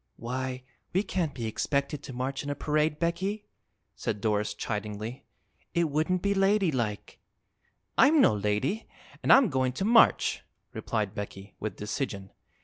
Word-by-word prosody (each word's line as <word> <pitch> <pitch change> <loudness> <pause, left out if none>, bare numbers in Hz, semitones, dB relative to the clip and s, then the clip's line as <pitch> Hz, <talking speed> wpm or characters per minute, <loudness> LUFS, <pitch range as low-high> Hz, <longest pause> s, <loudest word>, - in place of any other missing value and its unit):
"Why, 130 +1 -4 0.3
we 190 +3 +2
can't 175 -7 -2
be 115 - -4
expected 140 +5 -1
to 140 - -8
march 130 +2 -3
in 145 - -5
a 145 - -1
parade, 150 0 +1
Becky," 190 +6 -1 0.5
said 105 - -3
Doris 105 0 0
chidingly. 105 +4 -4 0.5
"It 170 -3 +2
wouldn't 165 +5 +1
be 200 0 +2
ladylike." 185 - +1 0.8
"I'm 300 +3 +7
no 265 - +6
lady, 105 - -1 0.3
an' - - -2
I'm 270 -4 +7
goin' 130 -3 0
to 165 +10 -2
march," 230 +1 +5 0.3
replied 105 -3 -2
Becky, 100 -1 -7
with 110 - -4
decision. 105 -2 -4
135 Hz, 140 wpm, -28 LUFS, 105-170 Hz, 0.8 s, I'm